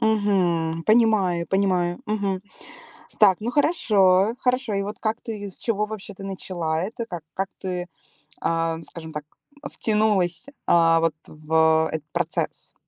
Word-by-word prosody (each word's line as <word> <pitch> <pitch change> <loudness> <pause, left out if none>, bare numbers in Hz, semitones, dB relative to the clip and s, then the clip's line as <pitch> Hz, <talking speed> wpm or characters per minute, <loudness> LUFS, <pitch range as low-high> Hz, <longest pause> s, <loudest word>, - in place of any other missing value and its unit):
Мгм. 185 -7 +1
Понимаю 215 -7 +3
понимаю. 185 -3 +1
Мгм. 200 -3 -1 0.8
Так, 195 -4 +6
ну, 230 - -2
хорошо, 215 - +3
хорошо. 250 -3 0
И 200 - 0
вот 205 +2 -6
как 220 +1 -1
ты, 210 -3 -5
с 185 - -13
чего 210 -2 -1
вообще 210 -1 -7
ты 195 - -10
начала 175 -4 -3
это? 225 +4 -4
Как 175 -6 -6
как 195 0 -2
ты, 180 -1 -3 0.6
эм, 165 0 -1
скажем 160 -1 -10
так, 150 -1 -5 0.5
втянулась, 210 -3 +1 0.2
а 165 -1 +5
вот 165 -2 +1
в 160 +1 +2
этот 155 -1 -5
процесс? - - -3
190 Hz, 140 wpm, -24 LUFS, 165-215 Hz, 0.8 s, Так